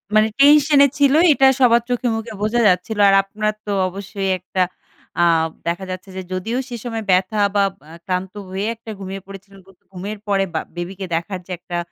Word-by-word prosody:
মানে 215 Hz, 0 st, +5 dB
টেনশন 290 Hz, 0 st, +6 dB
এ -, -, +4 dB
ছিল, 280 Hz, -1 st, +4 dB, 0.2 s
এটা 270 Hz, -1 st, +4 dB
সবার 235 Hz, -2 st, +5 dB
চোখে-মুখে 230 Hz, -2 st, -2 dB
বোঝা 220 Hz, +3 st, +1 dB
যাচ্ছিল। 185 Hz, +4 st, 0 dB
আর 195 Hz, -, +5 dB
আপনার 215 Hz, +2 st, -2 dB
তো 205 Hz, -, -3 dB, 0.2 s
অবশ্যই 195 Hz, +1 st, -4 dB
একটা 185 Hz, +1 st, -3 dB, 0.6 s
আ -, -, +5 dB, 0.4 s
দেখা 175 Hz, +3 st, -2 dB
যাচ্ছে 185 Hz, +1 st, -7 dB
যে, -, -, -3 dB
যদিও 220 Hz, +7 st, -2 dB
সে 245 Hz, -, -5 dB
সময় 225 Hz, -3 st, -4 dB
ব্যাথা 185 Hz, +4 st, +2 dB, 0.2 s
বা 200 Hz, -, +4 dB, 0.3 s
আ 160 Hz, -, -12 dB
ক্লান্ত 185 Hz, 0 st, -3 dB, 0.2 s
হয়ে 195 Hz, +3 st, -3 dB, 0.3 s
ঘুমিয়ে 195 Hz, 0 st, -6 dB
একটা -, -, -45 dB
পড়েছিলেন। 195 Hz, 0 st, -12 dB
ঘু 195 Hz, -, -18 dB, 0.2 s
ঘুমের 200 Hz, +4 st, -6 dB
পরে 195 Hz, -1 st, +2 dB
বা 160 Hz, -, 0 dB, 0.2 s
বেবিকে 185 Hz, +3 st, -5 dB
দেখার 180 Hz, +3 st, -3 dB
যে 185 Hz, -, -9 dB
একটা 175 Hz, 0 st, -5 dB
200 Hz, 185 wpm, -20 LUFS, 185-225 Hz, 0.6 s, টেনশন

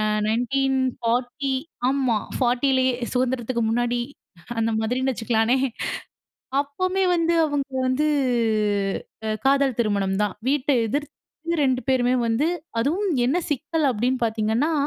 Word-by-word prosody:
அ -, -, +1 dB, 0.3 s
1940 255 Hz, +1 st, 0 dB, 0.4 s
ஆமா. 260 Hz, -5 st, +1 dB, 0.2 s
40 260 Hz, +1 st, +2 dB, 0.2 s
சுதந்திரத்துக்கு 250 Hz, -2 st, 0 dB
முன்னாடி 240 Hz, +1 st, 0 dB, 0.6 s
அந்த 225 Hz, 0 st, +1 dB
மாதிரின்னு 255 Hz, +4 st, 0 dB
வச்சுக்கலானே. 225 Hz, +2 st, +1 dB, 1.0 s
அப்போமே 370 Hz, +7 st, -1 dB
வந்து 335 Hz, 0 st, +2 dB
அவங்க 290 Hz, -2 st, -2 dB, 0.2 s
வந்து 270 Hz, +4 st, +1 dB, 1.2 s
அ -, -, 0 dB, 0.2 s
காதல் 275 Hz, -3 st, +3 dB
திருமணம் 200 Hz, -3 st, 0 dB
தான். 205 Hz, -, -3 dB
வீட்ட 285 Hz, 0 st, +1 dB, 0.2 s
எதிர்த்து 290 Hz, +6 st, -3 dB, 0.5 s
2 260 Hz, -1 st, +2 dB
பேருமே 250 Hz, -1 st, +3 dB
வந்து 230 Hz, +7 st, +1 dB, 0.3 s
அதுவும் 355 Hz, -, 0 dB
என்ன 265 Hz, +7 st, +2 dB
சிக்கல் 305 Hz, +2 st, 0 dB
அப்டினு 250 Hz, +3 st, 0 dB
பார்த்தீங்கன்னா, 225 Hz, +7 st, 0 dB
255 Hz, 110 wpm, -23 LUFS, 235-280 Hz, 1.2 s, காதல்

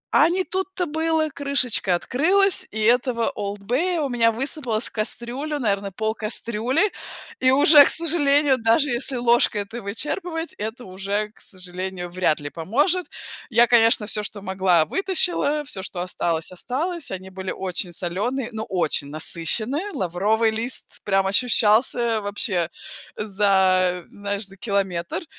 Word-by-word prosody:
А 315 Hz, -, +6 dB
не 370 Hz, +2 st, 0 dB
тут-то 380 Hz, 0 st, -3 dB
было! 320 Hz, 0 st, 0 dB
Крышечка 255 Hz, -10 st, 0 dB
открылась, 365 Hz, -, +1 dB
и 220 Hz, -, -6 dB
этого 235 Hz, +1 st, +2 dB
"Олд 205 Hz, 0 st, -5 dB
Бея" 330 Hz, -, 0 dB
у 285 Hz, -, -1 dB
меня 230 Hz, -2 st, +3 dB
высыпалось 245 Hz, -2 st, -1 dB
в -, -, -9 dB
кастрюлю, 240 Hz, +7 st, -4 dB
наверно, 200 Hz, -5 st, -1 dB
пол 220 Hz, +3 st, -2 dB
кастрюли. 230 Hz, -, -1 dB, 0.5 s
И 255 Hz, -, +4 dB
уже, 290 Hz, +2 st, +8 dB
к -, -, +1 dB
сожалению, 290 Hz, -4 st, +3 dB
даже 230 Hz, +6 st, +2 dB
если 255 Hz, +2 st, -1 dB
ложкой 240 Hz, -3 st, +2 dB
это 225 Hz, +4 st, -8 dB
вычерпывать, 325 Hz, -, -3 dB
это 220 Hz, +4 st, -6 dB
уже, 200 Hz, +3 st, -3 dB
к -, -, -25 dB
сожалению, 185 Hz, -1 st, -6 dB
вряд 175 Hz, -4 st, +1 dB
ли 145 Hz, 0 st, -7 dB
поможет. 290 Hz, -, 0 dB, 0.4 s
Я, 235 Hz, 0 st, +5 dB
конечно, 230 Hz, -2 st, +4 dB
всё, 210 Hz, 0 st, -1 dB
что 205 Hz, -1 st, -5 dB
могла- 185 Hz, -4 st, +2 dB
вытащила, 350 Hz, -, +2 dB
всё, 250 Hz, -9 st, -3 dB
что 185 Hz, -2 st, -5 dB
осталось- 170 Hz, -2 st, -2 dB
осталось. 300 Hz, -, -3 dB
Они 190 Hz, 0 st, -7 dB
были 190 Hz, 0 st, -6 dB
очень 180 Hz, -1 st, -3 dB
солёные, 205 Hz, +10 st, -3 dB
но 220 Hz, 0 st, -4 dB
очень 175 Hz, -5 st, 0 dB
насыщенные, 220 Hz, -, 0 dB
лавровый 205 Hz, +5 st, +1 dB
лист 230 Hz, +4 st, -5 dB
прям 195 Hz, -1 st, +1 dB
ощущался 225 Hz, +2 st, +2 dB
вообще 200 Hz, -4 st, -1 dB, 0.5 s
за 190 Hz, -3 st, +2 dB
знаешь, 200 Hz, 0 st, -4 dB
за 195 Hz, 0 st, -12 dB
километр. 190 Hz, -, -2 dB
220 Hz, 140 wpm, -23 LUFS, 190-275 Hz, 0.5 s, уже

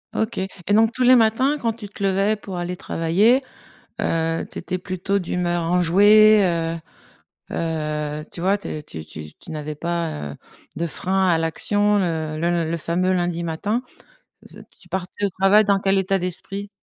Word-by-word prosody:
OK 220 Hz, +1 st, -1 dB
et 190 Hz, +1 st, -3 dB
donc 225 Hz, +2 st, +4 dB
tous 255 Hz, -, -1 dB
les 255 Hz, +1 st, +7 dB
matins, 250 Hz, +6 st, +3 dB
quand 230 Hz, -4 st, -1 dB
tu 210 Hz, -3 st, -10 dB
te 200 Hz, -, -12 dB
levais 195 Hz, +2 st, +2 dB
pour 190 Hz, -3 st, -7 dB
aller 175 Hz, +1 st, -4 dB
travailler, 195 Hz, +13 st, +2 dB, 0.6 s
heu, 165 Hz, 0 st, 0 dB
tu -, -, -5 dB
étais 185 Hz, +1 st, -3 dB
plutôt 185 Hz, +2 st, -2 dB
d'humeur 175 Hz, -1 st, -1 dB
enjouée, 205 Hz, +5 st, +5 dB
heu 165 Hz, -2 st, 0 dB, 0.7 s
heu, 150 Hz, -2 st, -3 dB
tu 170 Hz, -, -7 dB
vois? 195 Hz, +3 st, +2 dB
Tu 200 Hz, -, -9 dB
es 150 Hz, -1 st, -5 dB
tu 80 Hz, -, -9 dB
tu 75 Hz, -1 st, -9 dB
tu -, -, -13 dB
n'avais 150 Hz, 0 st, -5 dB
pas, 170 Hz, +1 st, -2 dB, 0.2 s
heu, -, -, -12 dB, 0.4 s
de 170 Hz, +2 st, -2 dB
frein 190 Hz, +4 st, 0 dB
à 165 Hz, -, +3 dB
l'action, 205 Hz, +6 st, +1 dB
heu, 160 Hz, -4 st, -2 dB
le 170 Hz, 0 st, 0 dB
le 170 Hz, -, -1 dB
fameux 180 Hz, +3 st, 0 dB
lundi 175 Hz, -1 st, -1 dB
matin. 205 Hz, +8 st, -2 dB, 1.0 s
Tu -, -, -12 dB
partais 190 Hz, +2 st, -4 dB
au -, -, +3 dB
travail 205 Hz, +2 st, +6 dB
dans 200 Hz, -1 st, +2 dB
quel 195 Hz, 0 st, +2 dB
état 195 Hz, 0 st, +1 dB
d'esprit? 195 Hz, +3 st, -5 dB
180 Hz, 175 wpm, -22 LUFS, 165-205 Hz, 1.0 s, les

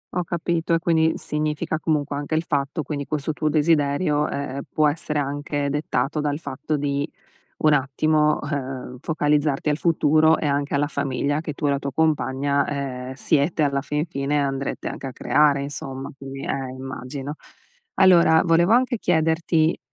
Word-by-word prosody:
Ho 180 Hz, -, +1 dB
capito, 170 Hz, 0 st, -1 dB
e -, -, +1 dB
quindi 160 Hz, -1 st, +2 dB
significa 155 Hz, +1 st, -2 dB
comunque 150 Hz, -3 st, -1 dB
anche 145 Hz, +2 st, -2 dB
il 160 Hz, -, +1 dB
fatto, 145 Hz, 0 st, -1 dB
quindi, 145 Hz, -2 st, -4 dB
questo 155 Hz, +1 st, -2 dB
tuo 155 Hz, 0 st, -1 dB
desiderio, 150 Hz, 0 st, +2 dB
ehm, 140 Hz, -1 st, -4 dB
può 155 Hz, -1 st, +3 dB
essere 150 Hz, 0 st, -2 dB
anche 145 Hz, 0 st, -2 dB
dettato 145 Hz, 0 st, -1 dB
dal 145 Hz, -1 st, -1 dB
fatto 155 Hz, 0 st, -3 dB
di 140 Hz, +1 st, -1 dB, 0.5 s
un 155 Hz, -1 st, +4 dB
attimo, 150 Hz, +3 st, +2 dB
uhm, 135 Hz, -3 st, -4 dB
focalizzarti 150 Hz, -2 st, 0 dB
al 150 Hz, -, +2 dB
futuro, 160 Hz, -1 st, +3 dB
e 150 Hz, -, -2 dB
anche 140 Hz, 0 st, 0 dB
alla 145 Hz, +1 st, +2 dB
famiglia 140 Hz, +1 st, -1 dB
che 155 Hz, -, -4 dB
tu 145 Hz, +1 st, -3 dB
e -, -, +3 dB
la 140 Hz, -, +1 dB
tua 140 Hz, -1 st, -5 dB
compagna, 140 Hz, -3 st, +1 dB
ehm, 130 Hz, -2 st, -4 dB
siete, 150 Hz, +3 st, +1 dB
alla 140 Hz, -1 st, 0 dB
fin 150 Hz, +3 st, -2 dB
fine 145 Hz, -2 st, -1 dB
andrete 135 Hz, 0 st, -3 dB
anche -, -, -6 dB
a -, -, -7 dB
creare 145 Hz, 0 st, +3 dB
insomma, 135 Hz, -1 st, -6 dB
poi, 135 Hz, 0 st, -8 dB
ehm, 135 Hz, -2 st, -3 dB
immagino. 130 Hz, +2 st, -6 dB, 0.6 s
Allora, 170 Hz, -4 st, +6 dB
volevo 170 Hz, +4 st, +4 dB
anche 245 Hz, -1 st, +3 dB
chiederti, 160 Hz, -1 st, +1 dB
145 Hz, 165 wpm, -23 LUFS, 140-160 Hz, 0.6 s, Allora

